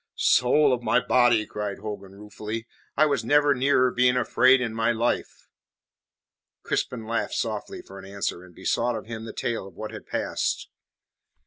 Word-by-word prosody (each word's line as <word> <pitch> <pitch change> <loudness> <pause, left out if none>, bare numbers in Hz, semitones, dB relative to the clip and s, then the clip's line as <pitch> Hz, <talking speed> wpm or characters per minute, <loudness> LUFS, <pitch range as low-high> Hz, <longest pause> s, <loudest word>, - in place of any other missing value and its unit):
"Soul 140 +2 +4
of 125 - -1
my 125 - +3
body!" 120 -3 +3
cried 105 -2 -4
Hogan 100 -2 -7
ruefully, 105 +2 -6 0.3
"I 155 - +6
was 140 -6 0
never 145 +4 +4
nearer 130 -1 +3
being 125 +1 +3
afraid 130 +2 +4
in 120 -3 -2
my 115 +1 +1
life." 120 +1 -2 1.2
Crispin 115 -3 -2
laughed 115 +1 -2
softly 110 -3 -3
for 95 0 -11
answer, 95 -2 -4
and 90 -2 -16
besought 120 0 0
of 110 - -6
him 110 0 -7
the 110 - -6
tale 115 -5 -3
of 95 - -15
what 110 +2 -6
had - - -10
passed. - - -2
115 Hz, 160 wpm, -25 LUFS, 105-125 Hz, 1.2 s, I